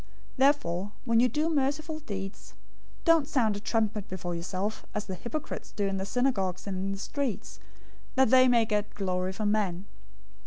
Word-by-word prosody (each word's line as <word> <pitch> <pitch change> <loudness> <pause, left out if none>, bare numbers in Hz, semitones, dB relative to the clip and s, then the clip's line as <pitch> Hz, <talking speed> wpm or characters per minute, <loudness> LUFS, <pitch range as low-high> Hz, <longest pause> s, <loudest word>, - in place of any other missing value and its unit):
006:002 - - -23 0.3
Therefore 210 - +2
when 230 -2 +4
you 250 +1 +5
do 300 +3 0
merciful 305 +1 0
deeds, 195 -8 -7 0.5
don't 330 -4 +5
sound 225 -8 +2
a - - -4
trumpet 215 -1 0
before 185 -3 -4
yourself, 185 +5 -3
as 210 0 -1
the 190 - -5
hypocrites 240 - -5
do 205 - -1
in 195 0 0
the 190 +1 -3
synagogues 200 -8 0
and 200 -2 -3
in 190 +1 -2
the 195 - -3
streets, 260 +2 -3 0.6
that 265 -3 +4
they 255 0 +7
may 235 -2 +5
get 210 -1 -1
glory 185 -2 -1
from 205 +2 0
men. 195 -4 0
210 Hz, 180 wpm, -29 LUFS, 195-260 Hz, 0.6 s, they